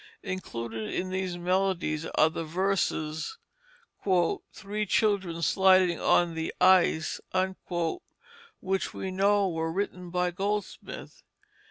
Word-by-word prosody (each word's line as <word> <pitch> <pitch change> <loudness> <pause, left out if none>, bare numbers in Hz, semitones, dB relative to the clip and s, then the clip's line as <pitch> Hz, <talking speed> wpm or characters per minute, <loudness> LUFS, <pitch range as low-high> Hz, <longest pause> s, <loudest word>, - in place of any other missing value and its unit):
Included 115 - -4
in 185 0 -2
these 185 -1 -2
melodies 180 -3 0
are 155 +1 +5
the 165 - -4
verses 170 - -1 1.1
"Three 210 +1 -4
children 190 -6 +1
sliding 185 -1 +4
on 175 -1 +3
the 160 0 -3
ice," 180 -4 +4 1.4
which 190 0 -2
we 190 - -4
know 200 +1 +3
were 165 -2 -2
written 180 -1 -3
by 180 0 0
Goldsmith. 205 +3 -4
185 Hz, 105 wpm, -28 LUFS, 165-195 Hz, 1.4 s, are